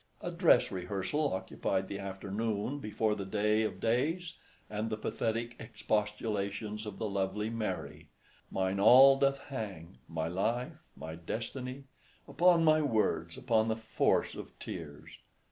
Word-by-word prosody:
A - - -4
dress - - +4
rehearsal 95 +11 -1
occupied 95 0 -2
the 100 - -5
afternoon 100 +6 -3
before 110 -2 0
the 100 - -4
day 105 +2 +1
of 110 - -2
days, 160 +9 0 0.3
and 105 +1 -3
the 110 - -2
pathetic 115 +2 -2
expostulations 105 -1 -2
of 105 - -6
the 110 - -2
lovely 100 +2 -1
Mary— 115 -2 -4 0.4
Mine 95 0 -1
all 130 +6 +9
doth 140 0 +3
hang—my 95 - -6
life—my 95 -3 -3
destiny— 125 +10 -5 0.4
Upon 170 +4 +4
my 155 -1 +5
words—upon 110 - +1
the 110 - +1
force 110 0 +1
of - - -9
tears! 75 0 -8
110 Hz, 125 wpm, -32 LUFS, 95-120 Hz, 0.4 s, all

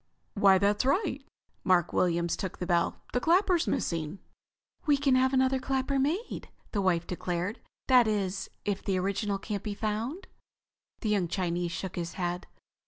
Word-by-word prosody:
"Why, 195 -2 +6
that's 205 +3 +2
right." 280 - +1 0.4
Mark 175 -3 +3
Williams 170 -1 +1
took 190 0 -5
the 180 - -3
bell. 170 -1 0
"The 250 - +2
clapper's 350 +3 +3
missing." 165 +1 -1 0.7
"We 290 -1 +5
can 275 -1 +2
have 260 0 +4
another 260 0 +3
clapper 270 +1 0
made," 325 - -2 0.2
his 205 - +1
wife 175 -3 +2
declared. 180 +4 -3 0.3
"That 250 -3 +6
is, 195 -3 -1 0.2
if 200 -1 -1
the 195 -2 0
original 200 +2 -1
can't 200 0 -4
be 205 -1 -4
found?" 225 - -3 0.8
The 220 - -1
young 200 -4 +2
Chinese 175 -1 -1
shook 185 0 -5
his 170 -1 -3
head. 175 -1 -3
200 Hz, 160 wpm, -29 LUFS, 180-260 Hz, 0.8 s, Why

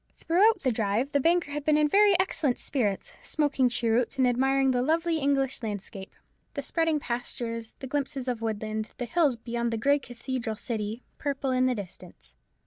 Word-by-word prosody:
Throughout 390 +6 +3
the 260 - +2
drive 220 +4 0
the 285 - +2
banker 335 +1 +2
had 295 0 -3
been 300 0 +3
in 300 0 +4
very 400 +2 +5
excellent 310 -8 +1
spirits, 210 -9 -2
smoking 285 -4 +1
cheroots, 235 +2 0
and 260 -1 +4
admiring 265 +2 +2
the 250 -1 +1
lovely 325 +4 +1
English 275 -2 0
landscape, 200 -3 -6 0.4
the - - -3
spreading 325 -2 +1
pastures, 235 -2 -4
the - - -5
glimpses 270 -1 -3
of 245 -3 -2
woodland, 215 0 -3
the 245 - -3
hills 290 +1 +2
beyond 235 0 -3
the 230 - -1
grey 280 +6 +3
cathedral 245 -2 -4
city, 220 +1 -4 0.2
purple 275 -2 -2
in 255 0 +3
the 255 - +1
distance. 200 -5 -10
255 Hz, 175 wpm, -27 LUFS, 230-290 Hz, 0.4 s, very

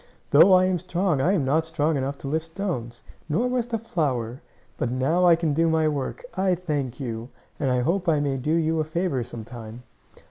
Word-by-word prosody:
"Though 165 +7 +7
I 185 0 +6
am 185 -1 +1
strong 180 -4 0
I 180 +8 +3
am 160 -9 +1
not 155 +5 +2
strong 160 -1 0
enough 140 +1 -2
to 140 - -8
lift 160 +3 -1
stones, 160 - -4 0.3
nor 225 +12 +1
was 250 -1 -1
the 235 -2 -1
flower. 135 - -2 0.4
But 125 - 0
now 135 +9 +1
I 170 - +7
can 165 -3 -1
do 165 +2 +2
my 160 -1 +2
work. 150 - -3
I 190 -1 +2
thank 145 -8 -3
you, 115 -2 -5 0.3
and 140 - 0
I 125 -1 +2
hope 175 +7 0
I 155 -2 +3
may 140 -2 0
do 150 +5 0
you 160 -1 +1
a - - +2
favor 155 -4 -1
some 115 -1 -7
time." 115 0 -10
155 Hz, 215 wpm, -25 LUFS, 130-175 Hz, 0.4 s, Though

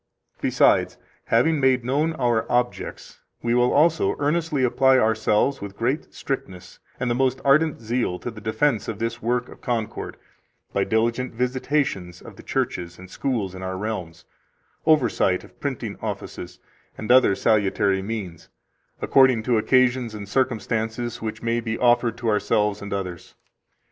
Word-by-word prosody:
24 - - -1 0.3
Besides, - - -4 0.3
having 150 +7 +2
made 130 -3 +2
known 150 +6 +1
our 120 -6 0
objects, 120 0 -2 0.2
we 120 0 +1
will 125 0 +3
also 160 +2 +3
earnestly 150 -1 0
apply 130 +1 +4
ourselves 110 +3 +2
with 100 0 -8
great 130 +6 -1
strictness 95 -9 -6 0.2
and 125 - -1
the 120 - +1
most 130 +1 +1
ardent 150 +3 +3
zeal 115 -5 -1
to 120 - -6
the 110 -1 -11
defense 110 +1 0
of 110 - -4
this 115 +1 -3
work 120 +2 0
of - - -14
concord, 115 -3 -3 0.6
by - - +2
diligent 115 +2 0
visitations 125 - -1
of - - -12
the - - -12
churches 85 -1 -3
and 95 0 -13
schools 115 -9 -2
in 95 - -8
our 95 0 -4
realms, 95 -6 -5 0.6
oversight 120 -11 +3
of - - -18
printing - - -4
offices, - - -6 0.4
and 110 +2 -2
other 125 -6 +6
salutary 100 -2 +2
means, 95 -5 -6 0.5
according 130 -4 +4
to 120 -1 +2
occasions 125 -1 +2
and 100 -1 -7
circumstances 115 -1 -1
which 110 0 -5
may 115 0 +1
be 115 -1 -3
offered 120 -1 +2
to 120 - -4
ourselves 105 -1 +1
and 100 - -7
others. 90 -3 -5
115 Hz, 155 wpm, -23 LUFS, 105-130 Hz, 0.6 s, other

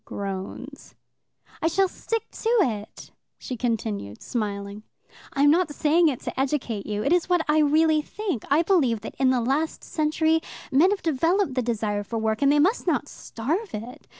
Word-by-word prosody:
Groans. 200 +8 -7 0.7
"I - - +2
shall 385 +4 +2
stick 455 +4 -3
to 450 - -3
it," 215 - -3 0.3
she 255 - -6
continued, 220 - -3
smiling. 200 -2 -4 0.5
"I 280 - +1
am 290 - +7
not 345 0 +2
saying 315 +3 +3
it 270 -6 -1
to - - -5
educate 260 -7 -1
you; 210 0 -2
it 280 - +2
is 355 0 +1
what 355 -1 +3
I 305 +1 +3
really 310 +1 +4
think. 375 - -4
I 295 +4 +4
believe 275 - +2
that - - -7
in 265 -1 +4
the 255 -2 +2
last 280 +7 -1
century 315 +1 +1 0.3
men 295 +8 +5
have 405 -1 -2
developed 330 +2 +1
the 255 - 0
desire 215 -3 -1
for 225 +3 -5
work, 220 +1 -1
and 280 0 +5
they 295 - +4
must 370 +11 +2
not - - +1
starve 320 - -4
it. 230 +4 -9
280 Hz, 180 wpm, -25 LUFS, 225-325 Hz, 0.7 s, am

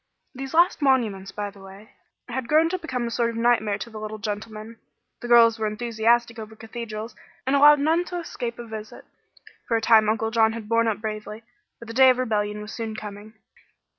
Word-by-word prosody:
These 270 +2 -6
last 345 -1 +4
monuments, 220 -9 +1
by 205 -1 -5
the 200 - -17
way, 195 +3 -14 0.4
had 245 0 -4
grown 315 +3 +4
to 370 +1 -2
become 255 -8 -3
a 235 - -4
sort 235 0 0
of 230 - -6
nightmare 230 -3 +2
to 220 +3 -7
the 215 - -8
little 215 0 -6
gentleman. 215 +2 -6 0.4
The 240 - -6
girls 230 -2 +6
were 215 - 0
enthusiastic 230 +2 0
over 220 0 -9
cathedrals, 225 0 -7 0.3
and 265 +2 +1
allowed 295 +1 +7
none 320 +4 +2
to 355 - -5
escape 240 -8 -5
a 240 - -8
visit. 220 -1 -9 0.6
For 230 - +2
a - - 0
time 220 -1 +5
Uncle 225 0 -1
John 220 -1 +3
had 225 -2 -7
borne 230 +1 +2
up 215 -2 -1
bravely, 215 0 -6 0.3
but 235 - -12
the 230 - -7
day 260 +2 +7
of 255 - +3
rebellion 210 -4 -1
was 210 - -9
soon 225 -2 -5
coming. 210 +1 -9
225 Hz, 205 wpm, -24 LUFS, 215-240 Hz, 0.6 s, allowed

